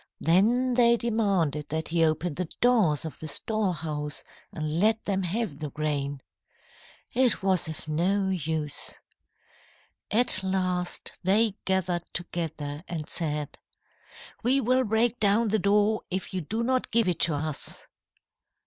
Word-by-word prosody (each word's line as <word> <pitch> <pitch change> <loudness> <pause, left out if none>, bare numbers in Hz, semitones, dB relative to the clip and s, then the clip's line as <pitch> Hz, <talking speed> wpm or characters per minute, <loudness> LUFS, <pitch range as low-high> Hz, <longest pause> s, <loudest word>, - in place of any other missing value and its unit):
Then 230 +10 +3
they 235 -1 +4
demanded 195 -11 0
that 160 +1 -3
he 165 0 +2
open 160 +1 0
the 175 +2 -4
doors 215 - +3
of 160 - -7
the 155 - -6
storehouse 155 -5 -2 0.3
and 155 +1 -3
let 220 +3 +2
them 195 -1 0
have 185 -4 -2
the 150 -2 -4
grain. 145 -2 -3 0.9
It 250 -5 +2
was 190 -3 +2
of 160 -1 -7
no 190 +6 +1
use. 160 -4 -2 1.1
"At 215 -3 +4
last, 185 -2 -2
they 205 +3 +3
gathered 185 -2 -1
together, 160 -4 -4
and 160 -3 -5
said: 150 -3 -3 0.8
"'We 260 +4 +2
will 255 +2 +2
break 225 +2 +1
down 215 +2 +3
the 215 +1 +1
door 205 +2 +2
if 190 +1 -4
you 185 - -2
do 220 +9 -3
not 255 +1 0
give 230 -2 +2
it 175 -3 0
to 165 -3 +4
us.' 155 0 +3
185 Hz, 140 wpm, -27 LUFS, 155-220 Hz, 1.1 s, they